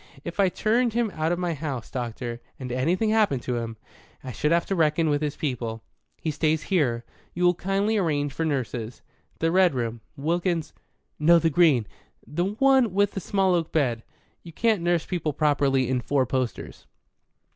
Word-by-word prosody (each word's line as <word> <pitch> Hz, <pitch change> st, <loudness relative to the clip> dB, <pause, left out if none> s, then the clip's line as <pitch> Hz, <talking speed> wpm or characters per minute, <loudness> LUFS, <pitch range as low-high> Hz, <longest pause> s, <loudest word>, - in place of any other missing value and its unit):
"If 170 Hz, +3 st, -7 dB
I 195 Hz, -2 st, +5 dB
turned 230 Hz, +5 st, +1 dB
him 235 Hz, -2 st, 0 dB
out 155 Hz, +1 st, -1 dB
of 175 Hz, -, 0 dB
my 175 Hz, -1 st, -1 dB
house, 140 Hz, -6 st, -5 dB
doctor, 120 Hz, -1 st, -4 dB, 0.2 s
and 125 Hz, -2 st, -5 dB
anything 175 Hz, -, +1 dB
happened 210 Hz, -, +2 dB
to 125 Hz, -1 st, -2 dB
him, 115 Hz, -1 st, -5 dB, 0.5 s
I 130 Hz, -, -6 dB
should 150 Hz, +7 st, -1 dB
have 170 Hz, 0 st, +3 dB
to 195 Hz, -, -1 dB
reckon 160 Hz, -1 st, +2 dB
with 145 Hz, 0 st, +1 dB
his 150 Hz, -2 st, -2 dB
people. 115 Hz, -6 st, -3 dB, 0.4 s
He 160 Hz, -, -2 dB
stays 155 Hz, +1 st, 0 dB
here. 125 Hz, -11 st, 0 dB, 0.3 s
You'll 175 Hz, 0 st, +3 dB
kindly 195 Hz, +5 st, 0 dB
arrange 145 Hz, -7 st, 0 dB
for 165 Hz, -, -2 dB
nurses. 125 Hz, -6 st, -3 dB, 0.3 s
The 165 Hz, 0 st, +1 dB
red 185 Hz, -4 st, +4 dB
room, 115 Hz, -2 st, -3 dB, 0.2 s
Wilkins, 170 Hz, +2 st, -1 dB, 0.5 s
no, 170 Hz, +3 st, +6 dB
the 165 Hz, 0 st, +2 dB
green 145 Hz, -8 st, +4 dB, 0.4 s
the 155 Hz, +8 st, -2 dB
one 240 Hz, 0 st, +3 dB
with 205 Hz, 0 st, +3 dB
the -, -, -4 dB
small 190 Hz, 0 st, +1 dB
oak 170 Hz, -2 st, 0 dB
bed. 125 Hz, -7 st, +1 dB, 0.4 s
You 170 Hz, -, -12 dB
can't 220 Hz, 0 st, +1 dB
nurse 175 Hz, -1 st, +1 dB
people 160 Hz, -5 st, -2 dB
properly 140 Hz, -3 st, +2 dB
in 130 Hz, 0 st, 0 dB
four 135 Hz, 0 st, +1 dB
posters. 130 Hz, -1 st, -4 dB
155 Hz, 180 wpm, -25 LUFS, 130-180 Hz, 0.5 s, no